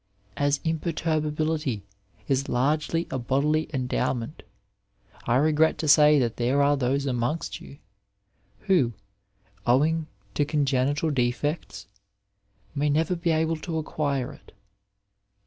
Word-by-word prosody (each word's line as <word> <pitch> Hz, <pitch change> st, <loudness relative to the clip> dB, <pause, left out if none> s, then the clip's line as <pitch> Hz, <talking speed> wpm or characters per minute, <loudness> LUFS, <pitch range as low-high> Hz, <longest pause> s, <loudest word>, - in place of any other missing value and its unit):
As 145 Hz, +3 st, +1 dB
imperturbability 155 Hz, -, -1 dB, 0.4 s
is 135 Hz, 0 st, 0 dB
largely 150 Hz, +6 st, 0 dB
a 130 Hz, -, -2 dB
bodily 150 Hz, +6 st, 0 dB
endowment, 125 Hz, 0 st, -2 dB, 0.9 s
I 120 Hz, -, +3 dB
regret 155 Hz, +3 st, +3 dB
to 155 Hz, -, -3 dB
say 150 Hz, 0 st, +7 dB
that 120 Hz, -4 st, 0 dB
there 130 Hz, +4 st, +2 dB
are 145 Hz, +1 st, +4 dB
those 135 Hz, +1 st, 0 dB
amongst 130 Hz, +4 st, -2 dB
you, 140 Hz, -, -12 dB, 0.8 s
who, 155 Hz, -, +2 dB, 0.7 s
owing 155 Hz, +6 st, +2 dB, 0.3 s
to 145 Hz, -, +1 dB
congenital 145 Hz, +1 st, +1 dB
defects, 125 Hz, -3 st, -2 dB, 0.9 s
may 145 Hz, +1 st, 0 dB
never 160 Hz, +4 st, +1 dB
be 170 Hz, 0 st, -2 dB
able 160 Hz, 0 st, +1 dB
to 160 Hz, +1 st, -4 dB
acquire 145 Hz, -3 st, -2 dB
it. -, -, -18 dB
145 Hz, 115 wpm, -26 LUFS, 130-155 Hz, 0.9 s, say